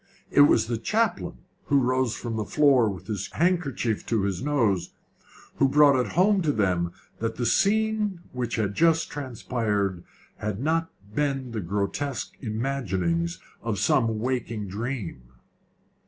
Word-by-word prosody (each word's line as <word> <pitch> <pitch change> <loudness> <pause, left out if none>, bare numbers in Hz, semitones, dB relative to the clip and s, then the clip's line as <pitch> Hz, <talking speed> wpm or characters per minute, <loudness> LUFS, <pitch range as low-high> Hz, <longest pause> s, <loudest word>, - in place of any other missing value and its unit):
It - - +6
was 110 - +4
the 115 -1 -2
chaplain, 115 - -1 0.2
who 140 - +3
rose 130 -2 +1
from 115 -2 -4
the 110 - -1
floor 135 -4 +4
with 95 -2 -7
his 105 -3 -4
handkerchief 150 - 0
to 110 -4 +1
his 95 -3 -1
nose, 115 -11 +1 0.6
who 135 - +4
brought 145 0 +6
it 125 -1 0
home 190 +3 +4
to 155 -4 +2
them 90 -7 +1 0.3
that 115 0 -2
the 120 - -2
scene 210 - +2
which 125 -2 -3
had 105 -3 -1
just 165 +4 +2
transpired 110 -8 -2 0.3
had 105 -2 -3
not 165 +4 0 0.2
been 135 -2 -1
the 110 -2 -3
grotesque 100 +9 -2
imaginings 105 -9 -1 0.2
of - - -2
some 115 -1 +2
waking 115 -3 -2
dream. 105 - -4
120 Hz, 140 wpm, -26 LUFS, 105-145 Hz, 0.6 s, It